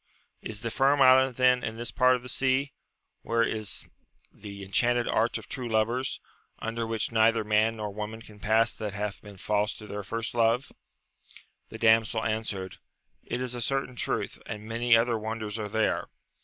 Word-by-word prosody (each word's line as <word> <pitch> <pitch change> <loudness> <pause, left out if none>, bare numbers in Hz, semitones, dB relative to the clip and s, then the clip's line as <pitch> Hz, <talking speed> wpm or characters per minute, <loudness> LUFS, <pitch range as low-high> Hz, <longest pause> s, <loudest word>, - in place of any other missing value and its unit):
— - - -46
Is 105 0 -5
the 115 - -3
Firm 140 +4 +3
Island 130 -1 +6
then 125 0 +4
in 115 - -4
this 120 0 -3
part 130 -1 +4
of 125 - -6
the - - -8
sea, 135 +2 +1 0.5
where 115 0 +1
is 110 -2 -3 0.4
the 100 -1 -9
enchanted 120 +5 +1
arch 115 +2 +1
of - - -11
true 125 -3 -4
lovers, 115 +4 0 0.4
under 115 0 -3
which 115 0 -1
neither 115 0 +3
man 110 +1 +2
nor 105 -1 -4
woman 110 +2 -6
can 105 -2 -15
pass 110 +3 +2
that 105 -2 -5
hath 100 0 -4
been 100 -2 -12
false 105 +2 0
to 110 - -11
their 105 -1 -5
first 115 +3 -4
love 120 +3 +2 0.5
% - - -24
The 110 - -8
damsel 110 -1 +3
answered, 110 -4 -3 0.5
It 125 - -3
is 125 -1 -1
a 120 - -3
certain 135 +1 -1
truth, - - -2
and 105 0 -6
many 115 +1 +4
other 115 0 +1
wonders 110 0 -4
are 105 -1 -4
there. 110 +1 0
115 Hz, 185 wpm, -28 LUFS, 105-120 Hz, 0.5 s, Island